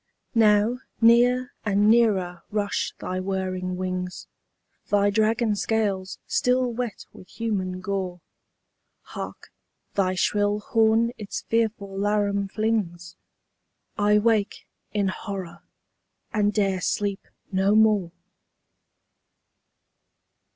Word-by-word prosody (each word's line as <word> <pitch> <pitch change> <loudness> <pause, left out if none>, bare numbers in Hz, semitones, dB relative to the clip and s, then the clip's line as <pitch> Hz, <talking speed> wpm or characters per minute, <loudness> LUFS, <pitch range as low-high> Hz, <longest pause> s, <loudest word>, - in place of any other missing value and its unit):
Now 220 +1 +4 0.2
near 245 +2 +4
and 205 0 +2
nearer 200 -7 +3
rush 205 -1 -1
thy 185 0 -4
whirring 185 -1 -2
wings, 185 -1 -4 0.6
Thy 205 0 +3
dragon 220 +1 +2
scales 200 -3 -1
still 250 -1 +1
wet 235 -3 -4
with 185 - -14
human 190 -5 -3
gore. 185 -2 -3 0.8
Hark, - - -8 0.4
thy 185 -2 +1
shrill 205 +2 +1
horn 225 +2 +2
its 205 -2 -5
fearful 220 -4 -1
laram 200 0 0
flings! 185 -6 -2 0.8
—I 210 0 +3
wake 210 -1 +1 0.3
in 200 -2 0
horror, 190 -3 -6 0.7
and 210 -2 +2
'dare 195 -3 0
sleep 200 +2 -2 0.2
no 195 +2 +2
more! 210 -5 +4
205 Hz, 95 wpm, -25 LUFS, 190-220 Hz, 0.8 s, Now